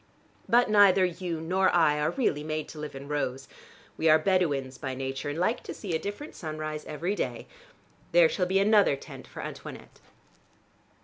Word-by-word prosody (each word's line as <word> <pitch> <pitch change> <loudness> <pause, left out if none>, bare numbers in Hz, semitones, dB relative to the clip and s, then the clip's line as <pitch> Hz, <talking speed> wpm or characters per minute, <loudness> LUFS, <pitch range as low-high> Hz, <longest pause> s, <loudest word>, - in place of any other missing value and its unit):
But 240 +1 +5
neither 200 -3 +6
you 175 -2 -3
nor 185 +4 +2
I 160 -4 +3
are 150 +1 +1
really 160 - 0
made 155 0 -3
to 155 - -9
live 150 -2 -6
in 135 +1 -8
rows. 135 -2 -3 0.5
We 160 - +2
are 155 - +7
Bedouins 155 -7 0
by 130 -1 -4
nature, 135 +2 -4
and 145 - -4
like 220 +8 0
to - - -8
see 195 -5 -5
a - - 0
different 205 - -6
sunrise 155 -1 -5
every 170 +6 -3
day. - - -3 0.7
There - - +6
shall 470 - -1
be 190 +1 +1
another 205 -5 +4
tent 140 - -11
for - - -8
Antoinette." - - -9
160 Hz, 180 wpm, -28 LUFS, 150-195 Hz, 0.7 s, are